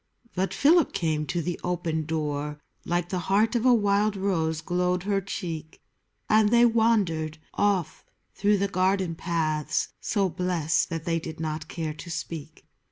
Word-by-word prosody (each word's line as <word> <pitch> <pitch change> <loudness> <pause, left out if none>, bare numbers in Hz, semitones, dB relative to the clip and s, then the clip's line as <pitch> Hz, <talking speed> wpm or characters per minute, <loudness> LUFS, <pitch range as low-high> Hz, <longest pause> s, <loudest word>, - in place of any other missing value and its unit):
But 190 +1 -1
Philip 325 +3 +4
came 155 -3 -1
to 170 +3 -1
the 175 +1 -3
open 170 -3 -2
door: 150 -2 -2 0.3
Like 175 0 -1
the 185 - -1
heart 210 +4 +3
of 240 +2 +2
a 250 - +7
wild 205 -1 +2
rose 165 -5 0
glowed 180 +1 0
her 200 0 0
cheek, 170 -4 -6 0.5
And 215 -1 +4
they 235 +1 +6
wandered 205 -9 +2 0.2
off 200 -5 0 0.3
through 205 +1 +2
the 200 +1 +1
garden 185 -2 +1
paths 155 -2 -1
So 200 -3 +1
blest 175 -2 0
that 165 -1 -4
they 165 -1 +1
did 160 0 -8
not 155 -1 -3
care 160 -2 -4
to 165 +3 -10
speak. 160 -2 -6
175 Hz, 160 wpm, -26 LUFS, 160-200 Hz, 0.5 s, a